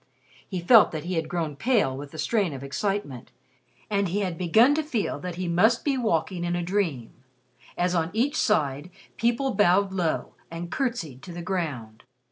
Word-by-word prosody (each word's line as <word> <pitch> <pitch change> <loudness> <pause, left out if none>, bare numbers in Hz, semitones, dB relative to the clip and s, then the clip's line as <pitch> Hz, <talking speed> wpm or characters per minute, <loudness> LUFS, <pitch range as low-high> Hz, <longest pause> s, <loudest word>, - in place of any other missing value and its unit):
He 185 - -3
felt 190 +2 +6
that 155 -2 -4
he 180 +2 -4
had 165 -2 -2
grown 160 -4 -2
pale 205 - +1
with 140 +1 -7
the 155 - -11
strain 200 -4 0
of 135 0 -7
excitement, 140 - -3 0.6
and 200 -2 0
he 195 +4 -1
had 185 -4 -2
begun 220 - +4
to 310 - +1
feel 270 -9 -2
that 180 -1 -5
he 180 0 -3
must 215 +8 +3
be 285 -2 +2
walking 185 -6 -1
in 175 0 -1
a 175 - -2
dream, 170 - -2 0.6
as 180 0 +1
on 165 -2 +1
each 250 +8 0
side 150 - +1 0.3
people 240 +3 0
bowed 195 0 +3
low 175 -4 -1 0.2
and 170 +1 -7
curtsied 175 - -3
to 180 - -10
the 175 0 -6
ground. 145 - -4
180 Hz, 185 wpm, -26 LUFS, 160-210 Hz, 0.6 s, felt